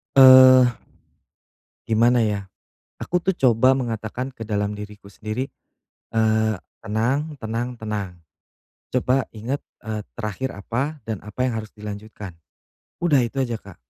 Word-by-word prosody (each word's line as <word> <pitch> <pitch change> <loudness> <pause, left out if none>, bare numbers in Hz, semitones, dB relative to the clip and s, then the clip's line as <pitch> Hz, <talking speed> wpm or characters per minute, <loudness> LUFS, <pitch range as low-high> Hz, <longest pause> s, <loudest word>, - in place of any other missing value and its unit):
Eee, 130 -1 +9 1.2
gimana, 115 +2 +4
ya? 100 -2 -2 0.5
Aku 180 - -1
tuh 190 - +2
coba 130 - +4
mengatakan 120 -1 -3
ke 115 - -7
dalam 105 -1 -2
diriku 105 -1 -10
sendiri, 110 +6 -4 0.6
eee, 110 -1 +2 0.3
"Tenang 130 +8 -1
tenang 120 +2 -4
tenang, 105 -3 -4 0.8
coba 130 0 +1
inget, 120 +6 -4 0.2
eee, 110 -1 -3 0.2
terakhir 120 +3 -3
apa 135 +9 -3
dan 110 -3 -4
apa 105 +5 -3
yang 125 - -1
harus 110 - -11
dilanjutkan." 105 -2 -8 0.7
Udah 150 -6 +4
itu 130 +2 0
aja, 120 -3 -3
Kak. 100 -3 -14
115 Hz, 125 wpm, -23 LUFS, 105-130 Hz, 1.2 s, Eee